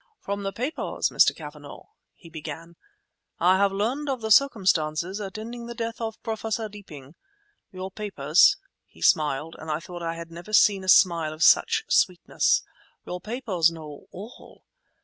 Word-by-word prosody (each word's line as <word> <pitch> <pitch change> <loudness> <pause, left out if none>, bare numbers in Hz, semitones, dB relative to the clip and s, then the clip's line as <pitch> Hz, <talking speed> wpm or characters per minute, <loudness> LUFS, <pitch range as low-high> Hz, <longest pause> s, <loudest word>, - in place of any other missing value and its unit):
"From 200 0 -4
the 195 0 -3
papers, 250 +10 -2
Mr. - - +4
Cavanagh," - - -10 0.3
he 175 - -16
began, 165 +1 -9 0.6
"I 185 +2 +4
have 200 0 +2
learned 245 +9 -2
of 265 -2 -1
the 220 0 -3
circumstances 185 - +2
attending 220 +4 -7
the 235 - -7
death 230 0 -5
of 225 -1 -4
Professor 225 -1 -3
Deeping. 160 -10 -12 0.6
Your 185 0 -7
papers"—he 200 - +1
smiled, 155 -3 +2
and 160 - -9
I 155 0 -1
thought 175 +1 -9
I 165 0 -3
had 165 0 -9
never 170 +5 -10
seen 200 -2 +4
a 185 - -3
smile 170 -4 +5
of 155 +2 -2
such 440 - +4
sweetness—"your 180 - -1
papers 215 -8 0
know 155 -3 -11
all! 205 +6 -12
190 Hz, 150 wpm, -25 LUFS, 165-220 Hz, 0.6 s, smile